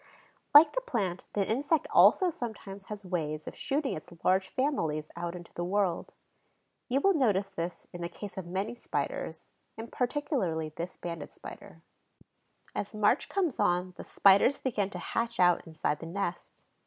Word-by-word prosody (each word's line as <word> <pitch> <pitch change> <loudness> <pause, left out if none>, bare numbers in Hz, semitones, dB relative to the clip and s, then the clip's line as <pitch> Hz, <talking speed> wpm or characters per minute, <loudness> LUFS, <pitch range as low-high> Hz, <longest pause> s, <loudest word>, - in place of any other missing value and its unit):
Like 300 +1 +10
the - - 0
plant, 195 - -2
the 200 -2 +1
insect 285 +7 +1
also 370 -3 +6
sometimes 200 -7 -6
has 210 -1 -7
ways 155 -4 -2
of - - -7
shooting 280 0 -1
its 155 +3 -8
large 190 +1 +3
families 165 - -1
out 170 0 -4
into 175 -1 -10
the 175 - -3
world. 185 -1 0 0.7
You 270 +3 +2
will 395 +4 +5
notice 205 - +2
this 170 -1 -5
in 175 - -7
the 170 - -3
case 205 +1 -8
of 190 -3 -6
many 195 +6 -2
Spiders, 240 - -4 0.3
and 225 +1 -7
particularly 245 - -1
this 170 +4 -6
Banded 170 -3 -6
Spider. 165 - -11 0.9
As 205 - -4
March 215 +5 +2
comes 360 -9 0
on 180 -2 +1
the - - -8
Spiders 200 +8 +5
begin 210 -7 -1
to - - -7
hatch 230 0 -2
out 175 -1 +4
inside 155 -2 -1
the 165 - -7
nest. 175 0 -4
195 Hz, 165 wpm, -30 LUFS, 175-245 Hz, 0.9 s, Like